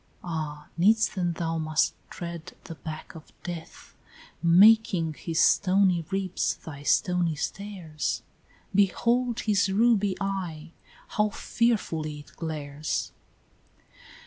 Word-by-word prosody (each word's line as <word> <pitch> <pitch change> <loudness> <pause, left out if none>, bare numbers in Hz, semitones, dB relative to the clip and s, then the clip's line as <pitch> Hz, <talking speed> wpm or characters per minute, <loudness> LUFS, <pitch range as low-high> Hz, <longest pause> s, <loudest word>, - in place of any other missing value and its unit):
"Ah, 155 -3 -4
needs 215 +6 +4
then 175 -3 -1
thou 165 -1 -2
must 155 -1 +1 0.2
tread 170 0 -7
the 165 - -8
back 155 +1 -8
of 160 -1 -13
death, 170 -2 -8 0.5
Making 180 -1 +5
his 165 +1 -3
stony 185 -3 +4
ribs 195 -2 -1
thy 145 -3 -10
stony 175 +2 +2
stairs. 175 -3 -4 0.5
Behold 235 +5 +2
his 200 -2 +2
ruby 205 -2 +3
eye, 180 -5 -4 0.4
how 210 0 +1
fearfully 165 -11 -1
it - - -19
glares!" 150 -2 -3
175 Hz, 105 wpm, -27 LUFS, 160-200 Hz, 0.5 s, Making